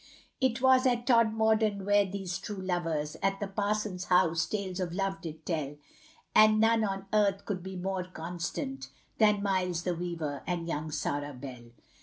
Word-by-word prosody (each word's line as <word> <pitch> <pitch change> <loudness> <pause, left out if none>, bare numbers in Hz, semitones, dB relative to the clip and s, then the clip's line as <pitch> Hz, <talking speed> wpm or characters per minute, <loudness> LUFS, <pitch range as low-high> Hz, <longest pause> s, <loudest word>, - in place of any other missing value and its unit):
It 260 -1 +1
was 260 0 +6
at 240 -1 +1
Todmorden 220 -4 +3
where 205 -1 +4
these 190 -2 -4
true 205 +1 -6
lovers, 165 -5 -2
At 195 0 +1
the 205 - -2
parson's 205 -2 -2
house, 170 -3 +3
tales 195 -3 -3
of 175 -2 -2
love 195 0 -1
did 160 -2 -8
tell, 150 -4 -2 0.6
And 215 0 +6
none 225 0 +4
on 195 -1 -2
earth 200 -2 +2
could 190 -3 -3
be 190 +1 -7
more 185 0 -2
constant, 160 -7 -5 0.3
Than 210 -2 +4
Miles 180 -4 0
the 180 - 0
weaver 165 -5 -4
and 170 -1 -2
young 155 -1 -3
Sarah 145 -1 -3
Bell. 125 -2 -9
190 Hz, 165 wpm, -30 LUFS, 165-210 Hz, 0.6 s, was